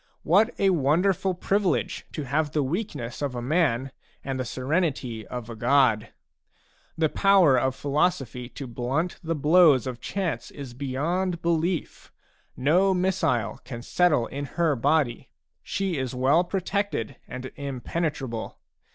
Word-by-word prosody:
What 200 Hz, +7 st, +4 dB
a 195 Hz, -1 st, +3 dB
wonderful 180 Hz, +5 st, +2 dB
privilege, 195 Hz, +1 st, 0 dB
to 150 Hz, -, -3 dB
have 145 Hz, +3 st, -1 dB
the 150 Hz, -, +2 dB
weaknesses 135 Hz, -, -4 dB
of 140 Hz, -3 st, -2 dB
a -, -, -2 dB
man 135 Hz, -3 st, +1 dB, 0.3 s
and 135 Hz, -1 st, -3 dB
the 130 Hz, -, -2 dB
serenity 130 Hz, -, -2 dB
of 125 Hz, -3 st, -6 dB
a 115 Hz, -, -7 dB
god! 115 Hz, -3 st, +3 dB, 0.9 s
The 160 Hz, -1 st, +3 dB
power 190 Hz, -5 st, +5 dB
of 130 Hz, +1 st, +1 dB
philosophy 140 Hz, -5 st, -1 dB
to 140 Hz, -, -7 dB
blunt 130 Hz, +8 st, -2 dB
the 165 Hz, 0 st, -1 dB
blows 150 Hz, -3 st, +5 dB
of 125 Hz, -2 st, -5 dB
chance 190 Hz, -5 st, -3 dB
is 135 Hz, -4 st, -9 dB
beyond 165 Hz, +7 st, -2 dB
belief. 170 Hz, +1 st, -1 dB, 0.5 s
No 180 Hz, +8 st, +3 dB
missile 170 Hz, -, 0 dB
can 120 Hz, -3 st, -7 dB
settle 155 Hz, -8 st, +2 dB
in 140 Hz, +3 st, -5 dB
her 165 Hz, -4 st, +3 dB
body; 140 Hz, -1 st, +1 dB, 0.3 s
she 190 Hz, -6 st, -2 dB
is 130 Hz, -1 st, -3 dB
well 135 Hz, +7 st, +3 dB
protected 195 Hz, -, -2 dB
and 130 Hz, +1 st, -7 dB
impenetrable. 140 Hz, -2 st, -4 dB
145 Hz, 135 wpm, -26 LUFS, 130-175 Hz, 0.9 s, power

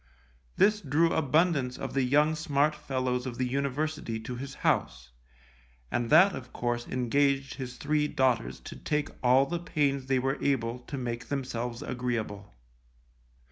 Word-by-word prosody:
This 210 Hz, +1 st, +4 dB
drew 160 Hz, +3 st, +2 dB
abundance 150 Hz, -3 st, +2 dB
of -, -, -5 dB
the 135 Hz, -, +2 dB
young 150 Hz, +5 st, +3 dB
smart 150 Hz, -1 st, +1 dB
fellows 130 Hz, -4 st, -2 dB
of 120 Hz, -2 st, -5 dB
the 130 Hz, -, 0 dB
university 140 Hz, -2 st, -2 dB
to 125 Hz, +3 st, -6 dB
his 135 Hz, +2 st, -7 dB
house, -, -, -1 dB, 0.8 s
and 120 Hz, -1 st, -1 dB
that 185 Hz, +5 st, +7 dB
of 125 Hz, -1 st, -8 dB
course 120 Hz, 0 st, -2 dB
engaged 135 Hz, +2 st, +1 dB
his 125 Hz, -2 st, -7 dB
three 150 Hz, -1 st, +1 dB
daughters 120 Hz, -, 0 dB
to -, -, -9 dB
take 150 Hz, 0 st, -1 dB
all 130 Hz, +2 st, +5 dB
the 170 Hz, +3 st, -3 dB
pains 140 Hz, -5 st, 0 dB
they 135 Hz, 0 st, +2 dB
were 135 Hz, +2 st, -1 dB
able 120 Hz, -3 st, 0 dB
to 140 Hz, +3 st, -7 dB
make 120 Hz, -2 st, -4 dB
themselves 125 Hz, -3 st, -3 dB
agreeable. 115 Hz, -5 st, -3 dB
130 Hz, 150 wpm, -29 LUFS, 125-150 Hz, 0.8 s, that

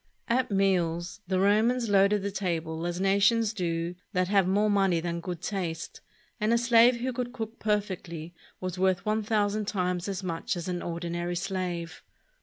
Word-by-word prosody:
At 250 Hz, +2 st, +1 dB
meals 180 Hz, -2 st, 0 dB
the 185 Hz, 0 st, +1 dB
Romans 225 Hz, +5 st, +3 dB
loaded 200 Hz, 0 st, +4 dB
the 200 Hz, -, -2 dB
table 165 Hz, -4 st, -2 dB
as 175 Hz, 0 st, -3 dB
nations 200 Hz, +3 st, +3 dB
do 170 Hz, -3 st, -2 dB, 0.2 s
that 185 Hz, -1 st, +1 dB
have 195 Hz, -3 st, +3 dB
more 205 Hz, +3 st, +3 dB
money 195 Hz, -4 st, +3 dB
than 170 Hz, 0 st, -3 dB
good 175 Hz, 0 st, -6 dB
taste, 180 Hz, -6 st, -4 dB, 0.4 s
and 215 Hz, +1 st, +1 dB
a 235 Hz, -, +5 dB
slave 235 Hz, +1 st, +5 dB
who 255 Hz, +1 st, -1 dB
could 245 Hz, 0 st, -3 dB
cook 225 Hz, -2 st, -6 dB
perfectly 185 Hz, -6 st, -2 dB, 0.3 s
was 185 Hz, -1 st, -4 dB
worth 190 Hz, -1 st, +2 dB
one 215 Hz, +1 st, +1 dB
thousand 210 Hz, -1 st, 0 dB
times 180 Hz, -3 st, -1 dB
as 195 Hz, -1 st, -4 dB
much 170 Hz, +2 st, -2 dB
as 170 Hz, -, -5 dB
an 180 Hz, -1 st, -2 dB
ordinary 175 Hz, +1 st, -3 dB
slave. 180 Hz, -2 st, -3 dB
190 Hz, 170 wpm, -28 LUFS, 175-210 Hz, 0.4 s, a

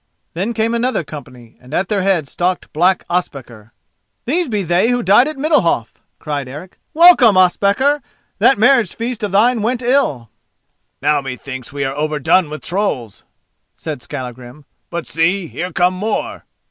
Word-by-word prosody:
Then 200 Hz, +8 st, -3 dB
came 225 Hz, +1 st, 0 dB
another 235 Hz, -4 st, 0 dB
company, 130 Hz, -6 st, -12 dB
and 130 Hz, +4 st, -8 dB
at 180 Hz, -, 0 dB
their 205 Hz, -2 st, 0 dB
head 185 Hz, -6 st, +1 dB
stalked 180 Hz, +5 st, -2 dB
black 180 Hz, +4 st, +2 dB
Ospakar. 130 Hz, -11 st, -4 dB, 0.5 s
"These 330 Hz, +4 st, 0 dB
be 210 Hz, -3 st, -1 dB
they 175 Hz, +6 st, +2 dB
who 245 Hz, -1 st, 0 dB
died 210 Hz, +7 st, +5 dB
at 305 Hz, -2 st, -5 dB
Middalhof," 270 Hz, -, 0 dB, 0.2 s
cried 145 Hz, -3 st, -4 dB
Eric. 150 Hz, +8 st, -10 dB, 0.2 s
"Welcome, 310 Hz, -, +7 dB
Ospakar! 200 Hz, +10 st, +2 dB, 0.4 s
that 270 Hz, -, +4 dB
marriage 235 Hz, -3 st, +3 dB
feast 235 Hz, 0 st, -4 dB
of 210 Hz, -3 st, -2 dB
thine 225 Hz, +4 st, +3 dB
went 245 Hz, +3 st, -1 dB
ill!" 235 Hz, -, 0 dB, 0.7 s
"Now 150 Hz, -1 st, +2 dB
methinks 130 Hz, -1 st, -7 dB
we 140 Hz, 0 st, -3 dB
are 135 Hz, 0 st, -3 dB
overdone 155 Hz, +3 st, +1 dB
with 155 Hz, +1 st, -8 dB
trolls," 150 Hz, -, -3 dB, 0.5 s
said 155 Hz, -5 st, -6 dB
Skallagrim; 125 Hz, +1 st, -8 dB, 0.2 s
"but 170 Hz, -1 st, -4 dB
see! 175 Hz, +4 st, 0 dB
here 180 Hz, +3 st, -5 dB
come 180 Hz, +2 st, +2 dB
more." 210 Hz, +4 st, -3 dB
180 Hz, 155 wpm, -17 LUFS, 145-230 Hz, 0.7 s, Welcome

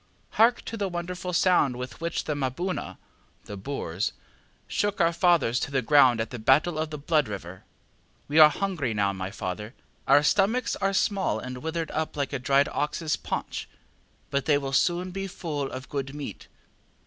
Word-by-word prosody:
ŌĆśHark 235 Hz, +2 st, +4 dB
to 230 Hz, -, -6 dB
the 200 Hz, -2 st, -1 dB
wonderful 180 Hz, +1 st, -4 dB
sound 170 Hz, -7 st, +3 dB
with 125 Hz, +4 st, -7 dB
which 170 Hz, 0 st, -2 dB
the 150 Hz, -, -2 dB
ŌĆ£MaboonaŌĆØ 145 Hz, +7 st, -3 dB, 0.5 s
(the 105 Hz, -, -7 dB
Boers) 100 Hz, -4 st, -3 dB, 0.5 s
shook 205 Hz, -1 st, -1 dB
our 170 Hz, -1 st, +3 dB
fathers 170 Hz, -9 st, +3 dB
to -, -, -3 dB
the 135 Hz, -2 st, 0 dB
ground 130 Hz, -3 st, +5 dB
at 110 Hz, -, -2 dB
the 125 Hz, -, -6 dB
Battle 150 Hz, +8 st, +3 dB
of 155 Hz, 0 st, -1 dB
the 150 Hz, -, -5 dB
Blood 150 Hz, -1 st, +1 dB
River. 95 Hz, -3 st, -8 dB, 0.6 s
We 150 Hz, +2 st, +3 dB
are 155 Hz, -1 st, +10 dB
hungry 155 Hz, -, -2 dB
now, 100 Hz, -1 st, +1 dB
my 95 Hz, 0 st, -4 dB
father; 105 Hz, +5 st, -5 dB, 0.3 s
our 145 Hz, -, +6 dB
stomachs 210 Hz, +9 st, +2 dB
are 195 Hz, 0 st, +1 dB
small 195 Hz, -, +1 dB
and 125 Hz, +3 st, -6 dB
withered 160 Hz, +2 st, -3 dB
up 155 Hz, -1 st, -3 dB
like 140 Hz, 0 st, -2 dB
a 140 Hz, -, -1 dB
dried 140 Hz, +2 st, +3 dB
oxŌĆÖs 150 Hz, +2 st, -2 dB
paunch, -, -, -4 dB, 0.6 s
but 140 Hz, -2 st, 0 dB
they 145 Hz, -2 st, +4 dB
will 135 Hz, -1 st, -4 dB
soon 175 Hz, +5 st, +1 dB
be 195 Hz, +1 st, -4 dB
full 150 Hz, -6 st, -4 dB
of 130 Hz, +1 st, -7 dB
good 140 Hz, 0 st, -4 dB
meat. 140 Hz, -9 st, -7 dB
145 Hz, 180 wpm, -26 LUFS, 130-175 Hz, 0.6 s, are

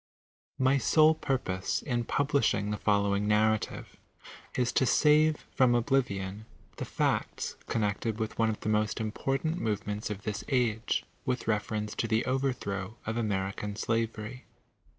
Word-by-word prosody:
My 130 Hz, +1 st, +3 dB
sole 155 Hz, +6 st, +5 dB
purpose 130 Hz, -11 st, -2 dB
in 120 Hz, -4 st, -1 dB
publishing 115 Hz, -8 st, +1 dB
the 105 Hz, -, -1 dB
following 100 Hz, 0 st, +1 dB
Narrative 110 Hz, 0 st, +1 dB, 0.6 s
is 125 Hz, -1 st, +1 dB
to 130 Hz, -, +2 dB
save 155 Hz, +2 st, +4 dB
from 125 Hz, -2 st, +4 dB
oblivion 110 Hz, -5 st, 0 dB, 0.3 s
the -, -, -3 dB
facts -, -, -1 dB
connected 110 Hz, 0 st, -1 dB
with 110 Hz, 0 st, -4 dB
one 115 Hz, -1 st, +3 dB
of 110 Hz, -, -3 dB
the -, -, -5 dB
most 105 Hz, 0 st, +1 dB
important 135 Hz, +9 st, -1 dB
movements 105 Hz, -1 st, -2 dB
of 105 Hz, -1 st, -5 dB
this 105 Hz, 0 st, -3 dB
age, 120 Hz, -4 st, +1 dB, 0.2 s
with 130 Hz, -2 st, -2 dB
reference 105 Hz, -1 st, -1 dB
to 115 Hz, -, 0 dB
the 110 Hz, +1 st, +1 dB
overthrow 120 Hz, -6 st, -2 dB
of 110 Hz, -, -2 dB
American 100 Hz, -2 st, -2 dB
Blavory. 115 Hz, +1 st, -2 dB
110 Hz, 135 wpm, -30 LUFS, 105-130 Hz, 0.6 s, sole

